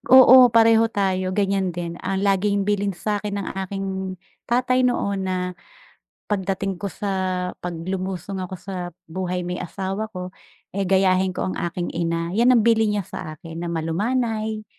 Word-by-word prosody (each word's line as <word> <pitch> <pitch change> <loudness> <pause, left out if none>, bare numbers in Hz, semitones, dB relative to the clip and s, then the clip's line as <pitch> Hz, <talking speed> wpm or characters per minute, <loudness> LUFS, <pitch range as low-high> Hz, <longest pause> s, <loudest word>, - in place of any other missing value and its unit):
oo 260 0 +10
pareho 225 0 +5
tayo 185 -3 -1
ganyan 195 -3 0
din, 170 -1 -5
ang 190 +1 -2
laging 200 0 +2
bilin 200 -2 0
sa'kin 210 +1 -2
ng 200 -2 -3 0.2
aking 190 -1 -4 0.3
tatay 255 +1 +2
noon 200 -6 +1
na, 180 0 -1 0.8
pagdating 195 -1 -1
ko 200 -2 -3
sa 200 +4 -4 0.5
kapag 170 -1 -5
lumusong 190 0 -3
ako 185 +1 -5
sa 180 -3 -5 0.2
buhay 180 +1 -3
may 180 0 -3
asawa 195 +4 -4
ko, 180 -2 -6 0.4
eh, 200 - 0
gayahin 190 0 +3
ko 180 - -3
ang 185 - -2
aking 175 +1 -2
ina, 170 0 -1
'yan 235 +3 +4
ang 235 -3 +5
bilin 225 -2 +4
niya 195 - -2
sa 155 0 -7
akin 165 +1 -8
na 170 - -3
malumanay, 215 +6 -1
190 Hz, 160 wpm, -23 LUFS, 180-210 Hz, 0.8 s, oo